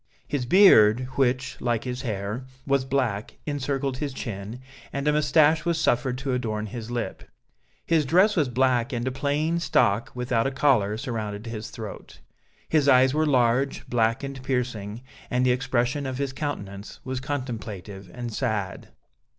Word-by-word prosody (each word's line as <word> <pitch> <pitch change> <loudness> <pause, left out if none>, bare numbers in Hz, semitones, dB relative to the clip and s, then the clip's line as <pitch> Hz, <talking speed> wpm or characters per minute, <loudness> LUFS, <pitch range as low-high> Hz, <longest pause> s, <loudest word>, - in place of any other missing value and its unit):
His 130 -3 -2
beard, 125 - +6
which, 130 0 0
like 120 -2 0
his 125 0 -4
hair, 110 +1 -4 0.2
was 140 -2 +1
black, 125 -6 -1
encircled 140 -2 -2
his 145 -1 -3
chin, 110 -1 -6 0.3
and 140 +1 -3
a 150 - +4
moustache 150 +1 +4
was 170 -2 0
suffered 125 -3 +1
to 135 0 -2
adorn 110 -4 -2
his 110 +1 -7
lip. 120 -2 -4 0.6
His 165 -2 +3
dress 185 +9 +4
was 150 -7 +2
black 125 0 +2
and 120 +1 -2
a - - 0
plain 145 +5 0
stock, 110 -9 +2
without 125 -1 0
a - - -1
collar, 125 -7 +2
surrounded 110 -4 -4
his 115 -2 -6
throat. 110 -3 -9 0.5
His 150 -3 +3
eyes 130 0 +6
were 155 +1 +2
large, 130 0 +2
black, 115 +1 +1
and 135 -1 -6
piercing, 125 -4 -3 0.3
and 125 +1 +1
the 125 - +4
expression 125 +2 0
of 130 -1 -4
his 140 -1 -2
countenance 100 -9 -5
was 130 0 -3
contemplative 110 -8 -5
and 120 0 -6
sad. 105 -7 -2
125 Hz, 160 wpm, -25 LUFS, 115-140 Hz, 0.6 s, beard